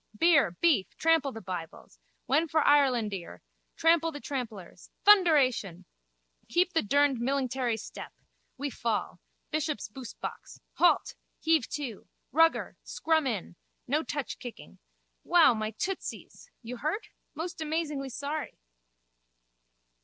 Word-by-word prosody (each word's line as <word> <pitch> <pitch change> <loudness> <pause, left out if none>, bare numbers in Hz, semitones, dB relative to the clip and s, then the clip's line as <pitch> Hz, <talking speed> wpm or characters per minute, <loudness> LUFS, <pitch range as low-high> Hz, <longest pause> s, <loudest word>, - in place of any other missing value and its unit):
Beer, 325 - +5
beef, 200 - +1
trample 325 -4 +3
the 225 - -8
bibles. 175 -3 -7 0.3
When 310 +5 +2
for 315 +1 +2
Irelandear. 240 -11 +2 0.3
Trample 330 0 +3
the 290 - -7
trampellers. 235 -11 -6 0.2
Thunderation! 275 - +4 0.6
Keep 360 +7 +2
the 325 - +3
durned 280 +3 +2
millingtary 255 -2 -1
step. - - -8 0.5
We 285 0 -3
fall. 230 -3 -2 0.3
Bishops 305 -8 -2
boosebox. 250 +2 -8 0.2
Halt! 350 - +3 0.3
Heave 320 -6 +2
to. 265 -8 -6 0.2
Rugger. 325 +4 +3
Scrum 315 -3 0
in. 205 -7 -3 0.3
No 290 +5 +1
touch 285 -5 -4
kicking. 245 -2 -10 0.4
Wow, 335 -7 +6
my 215 -1 -2
tootsies! 365 - -6
You 245 +2 -6
hurt? 315 - -3 0.3
Most 330 +2 -5
amazingly 300 -3 -2
sorry! 285 +4 -4
280 Hz, 115 wpm, -29 LUFS, 230-320 Hz, 0.6 s, Wow